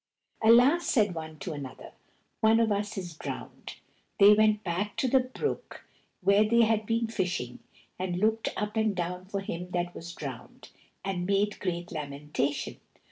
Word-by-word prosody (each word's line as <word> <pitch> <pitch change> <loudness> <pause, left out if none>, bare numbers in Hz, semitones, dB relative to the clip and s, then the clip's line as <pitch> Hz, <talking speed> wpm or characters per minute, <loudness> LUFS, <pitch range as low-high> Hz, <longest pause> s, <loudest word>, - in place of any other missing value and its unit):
"Alas!" 250 +10 +6
said 210 -7 +3
one 160 -1 -7
to 185 -2 -5
another, 140 -3 -8 0.5
"one 220 +1 +5
of 225 -2 +2
us 205 +1 -1
is 175 -3 -5
drowned." - - -7 0.4
They 200 +1 +9
went 215 0 +3
back 195 +4 -2
to 265 - 0
the 265 +2 +5
brook 255 - -4 0.4
where 200 +3 +5
they 230 +2 +4
had 220 -1 +1
been 230 0 +1
fishing, 180 - -3 0.4
and 180 -1 -2
looked 220 +3 +1
up 210 +1 -3
and 220 -2 +1
down 180 +1 -3
for 200 +1 -3
him 180 -2 -5
that 175 0 -1
was 170 +1 -8
drowned, 135 -5 -8 0.4
and 180 -2 -2
made 200 +1 +1
great 175 -2 -3
lamentation. 145 -2 -3
200 Hz, 160 wpm, -29 LUFS, 175-220 Hz, 0.5 s, They